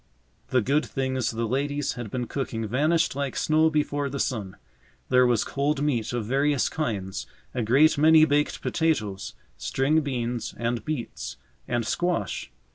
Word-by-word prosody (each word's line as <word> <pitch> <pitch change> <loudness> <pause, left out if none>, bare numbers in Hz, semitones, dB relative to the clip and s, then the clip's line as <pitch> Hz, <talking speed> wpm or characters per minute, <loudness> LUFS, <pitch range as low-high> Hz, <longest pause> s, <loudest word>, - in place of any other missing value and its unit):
The 130 - +2
good 145 +6 +2
things 130 -3 -1
the 115 0 -2
ladies 140 +3 -1
had 120 -3 -6
been 125 +3 -2
cooking 115 -3 -3
vanished 150 +8 +1
like 140 -2 -2
snow 155 +1 +3
before 145 -2 0
the 140 +1 -4
sun. 100 -8 -2 0.5
There 125 -1 +5
was 120 -3 +2
cold 140 +1 -1
meat 120 -7 0
of 120 -3 -2
various 140 +3 +2
kinds, 100 -11 -3 0.3
a 125 - -1
great 140 +7 +4
many 155 +1 +7
baked 150 -1 0
potatoes, 110 - -1 0.2
string 145 +4 +1
beans, 120 -4 -3
and 120 0 -1
beets, 150 -6 -5 0.3
and 120 -2 -1
squash. 175 - -1
135 Hz, 150 wpm, -26 LUFS, 120-150 Hz, 0.5 s, many